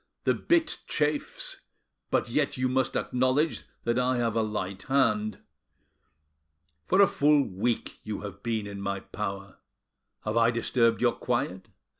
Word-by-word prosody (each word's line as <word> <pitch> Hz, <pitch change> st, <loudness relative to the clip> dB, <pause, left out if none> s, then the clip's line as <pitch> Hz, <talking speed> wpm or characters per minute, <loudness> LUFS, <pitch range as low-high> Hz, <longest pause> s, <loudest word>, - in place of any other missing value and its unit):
The -, -, +3 dB
bit 335 Hz, -2 st, +1 dB
chafes, 150 Hz, -1 st, -1 dB, 0.5 s
but -, -, +1 dB
yet 140 Hz, +4 st, 0 dB
you 130 Hz, 0 st, +1 dB
must 130 Hz, +1 st, 0 dB
acknowledge 130 Hz, +5 st, +1 dB, 0.2 s
that 120 Hz, +1 st, +1 dB
I 125 Hz, 0 st, +2 dB
have 115 Hz, -2 st, 0 dB
a 115 Hz, -, +3 dB
light 100 Hz, -3 st, -3 dB
hand. 110 Hz, -6 st, +1 dB, 1.5 s
For 190 Hz, +2 st, +5 dB
a -, -, +9 dB
full 145 Hz, -4 st, +4 dB
week 110 Hz, +5 st, -2 dB
you 105 Hz, -2 st, -4 dB
have 100 Hz, -1 st, -8 dB
been 110 Hz, -2 st, -1 dB
in 100 Hz, -1 st, -6 dB
my 100 Hz, 0 st, -2 dB
power. 100 Hz, -2 st, -6 dB, 0.7 s
Have 110 Hz, +1 st, 0 dB
I 115 Hz, 0 st, +5 dB
disturbed 115 Hz, 0 st, +2 dB
your 120 Hz, -, +4 dB
quiet? 95 Hz, -6 st, -2 dB
115 Hz, 145 wpm, -28 LUFS, 105-130 Hz, 1.5 s, a